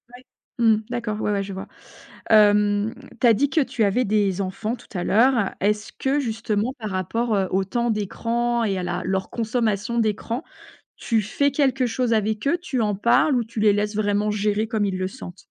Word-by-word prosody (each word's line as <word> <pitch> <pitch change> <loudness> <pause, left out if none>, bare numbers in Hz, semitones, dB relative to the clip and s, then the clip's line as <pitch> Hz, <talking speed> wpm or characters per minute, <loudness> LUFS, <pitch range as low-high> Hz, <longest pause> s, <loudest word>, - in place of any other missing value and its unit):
Ouais. 250 - -15 0.4
Mmh, 225 -2 +5
d'accord. 235 -3 -3
Ouais, - - 0
ouais, 200 -1 0
je 195 0 -7
vois. 190 - -7 0.6
Hem, 210 0 +4 0.3
tu 245 - +5
as 230 - +7
dit 275 +7 +1
que 310 +3 +2
tu 245 -4 -1
avais 215 +5 +2
des 200 -2 +1
enfants 205 +4 -3
tout 235 - -17
à 175 - -2
l'heure. 230 0 +3
Est-ce 210 +2 0
que 275 +2 0
justement 225 -1 -2
par 215 -2 -4
rapport, 215 +5 -1
heu, 195 -1 +1
au 190 +1 +1
temps 235 +4 -1
d'écran 235 +3 -1
et 200 -3 0
à 185 - -3
la 175 0 -3
leur 190 +1 -1
consommation 230 -1 -1
d'écran, 225 +3 -1 0.5
tu 225 -2 0
fais 280 +8 0
quelque 270 -2 +1
chose 235 0 0
avec 215 +2 0
eux? 335 - +2
Tu 265 -8 -2
en 210 -2 0
parles 240 +7 +3
ou 245 - +1
tu 225 0 -7
les 210 -1 +4
laisses 210 +1 -1
vraiment 210 0 +1
gérer 210 +1 0
comme 220 -2 0
ils 190 -2 -2
le 185 0 -1
sentent? 190 -4 -10
215 Hz, 205 wpm, -23 LUFS, 205-235 Hz, 0.6 s, as